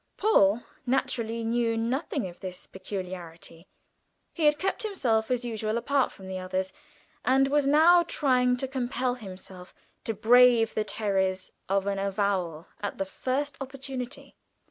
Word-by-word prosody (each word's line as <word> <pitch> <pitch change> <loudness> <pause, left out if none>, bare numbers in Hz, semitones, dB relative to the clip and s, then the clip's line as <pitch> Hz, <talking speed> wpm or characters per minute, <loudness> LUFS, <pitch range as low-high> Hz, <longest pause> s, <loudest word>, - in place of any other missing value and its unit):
Paul 235 - +4 0.2
naturally 230 -3 -1
knew 230 0 0
nothing 250 - -1
of 175 - -12
this 185 -1 -8
peculiarity; 180 -3 -8 0.7
he 325 - -1
had 295 0 +5
kept 385 +4 -2
himself 250 - 0
as 250 -1 0
usual 220 -1 -2
apart 275 +3 +1
from 190 - -12
the 190 0 -4
others, 185 +1 -3 0.5
and 270 +1 +4
was 285 0 +2
now 325 +5 +6
trying 255 -6 +2
to 265 - -2
compel 255 -1 -1
himself 190 -5 -10 0.3
to 225 - -2
brave 235 +1 +5
the 215 - 0
terrors 190 -4 -1 0.2
of 195 0 +1
an 200 -1 -1
avowal 195 -5 -1 0.2
at 205 - -4
the 195 - -1
first 270 +8 -3
opportunity. 265 -1 -7
230 Hz, 145 wpm, -27 LUFS, 190-265 Hz, 0.7 s, now